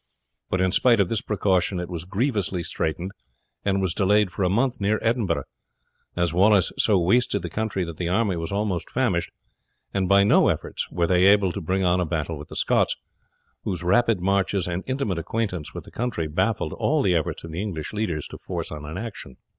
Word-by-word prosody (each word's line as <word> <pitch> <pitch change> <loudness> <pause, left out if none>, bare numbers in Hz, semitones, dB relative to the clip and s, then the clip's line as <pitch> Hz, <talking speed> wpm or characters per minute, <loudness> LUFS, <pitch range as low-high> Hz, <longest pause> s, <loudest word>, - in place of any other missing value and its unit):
But 95 - 0
in 95 0 +2
spite 120 +3 +4
of 95 -3 +2
this 115 -1 0
precaution 95 -3 +1
it 90 - -4
was 85 -2 -5
grievously 100 -4 -1
straitened, 85 +4 -2 0.5
and 100 -1 +1
was 90 -3 0
delayed 100 0 +3
for - - -5
a 90 - +2
month 120 +4 +1
near 105 +2 +2
Edinburgh, 115 -7 +1 0.7
as 85 -2 0
Wallace 100 +1 +4
so 105 -4 +3
wasted 100 +1 +2
the 85 - -5
country 110 -4 -1
that 85 -2 -6
the 85 -1 -2
army 100 0 +1
were 80 -1 -3
almost 100 -4 -1
famished, 110 -10 0 0.6
and 95 -2 0
by 100 0 +6
no 100 - +5
efforts - - -2
were 85 -1 0
they 90 +1 +3
able 100 -2 +5
to 100 - -5
bring 95 +3 0
on 90 +1 +3
a 90 - +1
battle 80 -1 -2
with 75 - -9
the - - -10
Scots, - - +2 0.7
whose 90 -2 -1
rapid 110 +2 +3
marches 95 -1 +1
and 90 +1 -3
intimate 130 -10 -1
acquaintance 90 -3 -3
with - - -6
the - - -15
country 105 -9 -2
baffled 105 +8 0
all 150 -1 +1
the 95 - +3
efforts 80 -3 -1
of 80 - -8
the 85 +4 -3
English 90 -7 -4
leaders 90 -8 -2
to - - -9
force - - -5
on 75 -1 -7
an 80 +4 -6
action. 105 - -7
95 Hz, 205 wpm, -24 LUFS, 85-105 Hz, 0.7 s, by